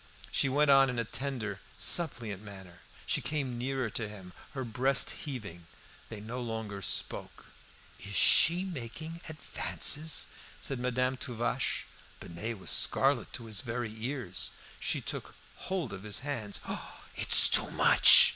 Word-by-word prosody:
She 135 - +3
went 145 +2 +4
on 135 -1 +6
in 125 - -3
a 115 - +1
tender, 115 -5 -4 0.2
suppliant 115 - -1
manner. 95 -4 -11 0.2
She - - +1
came 135 -6 -2
nearer 130 -2 -2
to 110 -1 -3
him, 95 -4 -11 0.2
her 135 - -3
breast 125 +3 +1
heaving; 100 - -7 0.4
they 110 - -7
no 115 +4 -6
longer 110 -4 -5
spoke. - - -3 0.5
"Is 100 +1 -8
she 170 - +5
making 160 -2 -6
him 170 +1 -10
advances?" 155 0 0 0.3
said 135 -3 -4
Madame 125 +1 0
Tuvache. 120 -3 -1 0.3
Binet 110 +7 -5
was 95 - -4
scarlet - - +2
to 115 - -6
his 110 -3 -1
very 120 -2 -4
ears. 115 - -2 0.3
She - - -1
took - - -5 0.2
hold 180 -9 -3
of 95 - -7
his 105 +2 -2
hands. 125 -8 -4
"Oh, - - -7
it's - - +7
too - - +6
much!" - - +8
120 Hz, 145 wpm, -31 LUFS, 105-135 Hz, 0.5 s, much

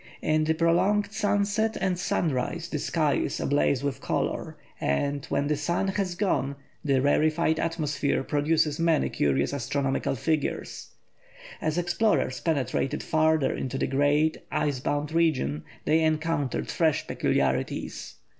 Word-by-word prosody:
In 155 0 +2
the 160 +1 +1
prolonged 190 +5 +2
sunset 205 +1 0
and 190 -1 +1
sunrise 170 +1 -1
the 150 - -2
sky 155 -1 +1
is - - -2
ablaze 140 -1 +1
with 140 -1 -2
colour, - - -2 0.2
and, 140 - 0
when 140 - 0
the 150 +1 +1
sun 170 +6 -1
has 190 -2 -1
gone, 140 -8 0 0.3
the 135 -3 +2
rarefied 155 +2 +2
atmosphere 150 -4 -1
produces 150 +1 +1
many 165 -2 +2
curious 70 - 0
astronomical 135 0 -1
figures. 155 +4 -2 0.7
As 155 +1 -1
explorers 175 - +1
penetrated 140 -4 -1
farther 160 -2 +2
into 130 +1 -3
the - - 0
great 145 +3 +2
ice 145 -3 0
bound 145 +3 -2
region 130 - +1 0.2
they 155 +2 +3
encountered 155 -3 0
fresh 160 -3 +1
peculiarities. 65 -1 -1
155 Hz, 130 wpm, -27 LUFS, 140-165 Hz, 0.7 s, they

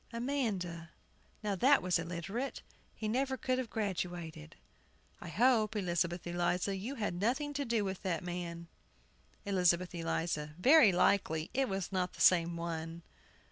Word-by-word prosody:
AMANDA. 215 - -2 0.5
Now, 210 -1 0
that 260 +7 +4
was 180 -1 +2
illiterate; 180 +10 -4 0.3
he 220 - -4
never 265 +4 0
could 255 0 0
have 250 -3 -3
graduated. 175 - -4 0.6
I - - -9
hope, 225 - +3
Elizabeth 175 -3 -1
Eliza, 175 +2 0
you 225 +9 -5
had 210 -7 -2
nothing 270 +7 0
to 285 0 -2
do 230 -4 0
with 190 -1 -4
that 180 -3 -2
man. 170 -1 -5 0.8
ELIZABETH 180 -2 +2
ELIZA. 165 -3 -2
Very 255 - +7
likely 175 -3 +2
it 270 -1 +1
was 195 -2 -3
not 185 -1 -1
the - - -14
same 170 -1 +4
one. 165 0 -5
185 Hz, 140 wpm, -33 LUFS, 170-230 Hz, 0.8 s, Very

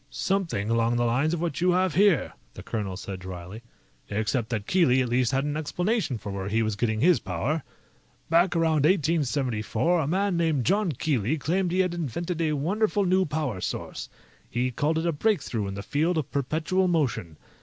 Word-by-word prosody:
"Something 170 - -1
along 115 +1 +2
the 120 0 +1
lines 135 +8 +1
of 165 - -5
what 170 -2 -2
you 180 0 +4
have 185 -2 +2
here," 190 -3 +3 0.2
the - - -9
colonel 100 -5 -3
said 95 -1 -6
dryly, 90 +3 -8 0.5
"except 110 +3 -1
that 110 -4 -2
Keely 160 -7 +3
at 125 - -3
least 125 0 +2
had 135 0 +1
an 145 0 -2
explanation 175 - -1
for 105 -2 -7
where 95 -1 -4
he 110 +2 +1
was 110 -1 -1
getting 110 +1 -1
his 175 +1 +5
power. 110 - -2 0.7
Back 170 +2 +3
around 160 -3 +2
1874, 150 - +1
a 150 - -1
man 190 +3 +1
named 160 -7 +1
John 195 -1 +2
Keely 135 0 0
claimed 175 +5 0
he 185 +2 +3
had 180 -2 0
invented 170 +2 -3
a 155 -2 +1
wonderful 200 +7 +1
new 185 +1 +3
power 145 -10 -3
source. - - -5 0.4
He 125 +2 -1
called 150 +5 0
it 160 - -1
a 170 - +2
breakthrough 145 - 0
in 95 - -5
the 100 - -6
field 160 - 0
of 155 - -2
perpetual 160 +7 0
motion. 115 - -1
150 Hz, 190 wpm, -26 LUFS, 115-175 Hz, 0.7 s, his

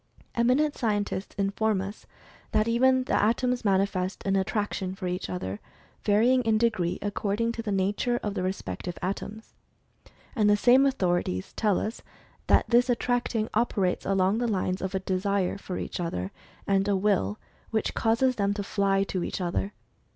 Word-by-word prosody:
Eminent 260 +6 +2
scientists 205 -4 -2
inform 200 +1 +1
us 195 +2 -7 0.5
that 215 +1 +3
even 260 +2 +3
the - - -3
atoms 245 +3 +1
manifest 190 -2 0
an 195 0 +2
attraction 195 -1 -1
for 190 - -6
each 180 +1 -3
other, 100 - -4 0.4
varying 230 +5 +4
in 225 -2 +2
degree 215 -7 +1
according 205 +2 -1
to 235 - -5
the 220 -2 -3
nature 205 +5 0
of 205 - -2
the 195 - -2
re 185 - +1
spective 175 - -5
atoms. 205 +3 -5 0.8
And 210 -4 +3
the 205 - +5
same 255 +5 +5
authorities 175 - -1
tell 210 -4 +1
us 220 +3 -4 0.5
that - - +4
this 245 +1 +4
attracting 240 -2 0
operates 205 -5 +1
along 195 +2 +2
the 240 - 0
lines 185 -3 -1
of 190 0 -3
a - - +1
"desire" 190 0 -1
for 185 -2 -5
each - - -5
other, 95 - -3 0.3
and 195 0 +2
a 200 - +2
"will" 190 - +1 0.3
which 220 -1 -1
causes 235 +3 +2
them 200 -1 +1
to 205 - -3
flv 195 -1 +1
to 185 -2 -3
each - - -3
other. 180 +2 -1
205 Hz, 165 wpm, -27 LUFS, 190-230 Hz, 0.8 s, the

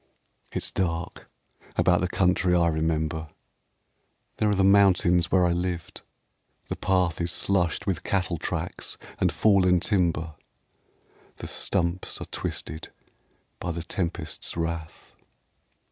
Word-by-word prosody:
It's - - -3
dark 85 -1 -3 0.5
about 90 -1 +4
the 90 - +1
country 90 0 +2
I 85 -1 +4
remember. 80 0 -1 1.1
There 105 - +2
are 105 - +2
the 95 - +3
mountains 90 -3 +5
where 90 -1 +4
I 85 - +2
lived. 85 -1 -3 0.7
The - - -2
path 90 -3 +1
Is 85 0 0
slushed 90 -4 +1
with 95 -7 -1
cattle 90 -4 -1
tracks - - -3 0.2
and - - +3
fallen 95 -4 +4
timber, 85 -4 0 1.0
The - - -8
stumps 90 -1 -1
are - - -5
twisted 80 - -5 0.7
by 90 - -2
the 85 0 -4
tempests' 85 -2 -4
wrath. 85 -1 -4
90 Hz, 120 wpm, -26 LUFS, 85-95 Hz, 1.1 s, mountains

